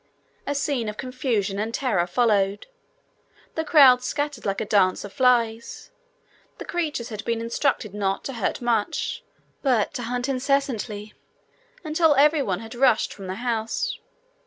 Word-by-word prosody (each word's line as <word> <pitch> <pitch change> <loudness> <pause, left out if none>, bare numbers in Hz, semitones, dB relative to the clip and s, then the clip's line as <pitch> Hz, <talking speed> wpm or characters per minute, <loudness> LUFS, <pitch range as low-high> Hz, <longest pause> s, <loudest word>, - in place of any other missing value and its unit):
A 285 - -1
scene 275 -5 -1
of 210 - -7
confusion 235 -6 -2
and 220 +2 -2
terror 230 -9 0
followed. 200 -1 +1 0.9
The 320 - -2
crowd 275 -6 +7
scattered 290 -2 -3
like 195 - -1
a 220 - -2
dance 195 -3 +2
of 205 - -10
flies. 235 -4 +1 0.7
The - - -8
creatures 305 -9 -3
had 215 -2 -6
been 230 -1 -1
instructed 230 -2 -1
not 195 -2 -1
to 270 - -5
hurt 230 +1 -2
much, 230 -3 -1 0.4
but 250 -7 +1
to - - -4
hunt 245 +2 -2
incessantly, 255 -6 -1 0.7
until 315 -1 +3
everyone 275 - +3
had 225 0 -9
rushed 245 -2 +2
from 195 -2 -9
the 185 - -4
house. 235 - -2
235 Hz, 145 wpm, -24 LUFS, 210-275 Hz, 0.9 s, crowd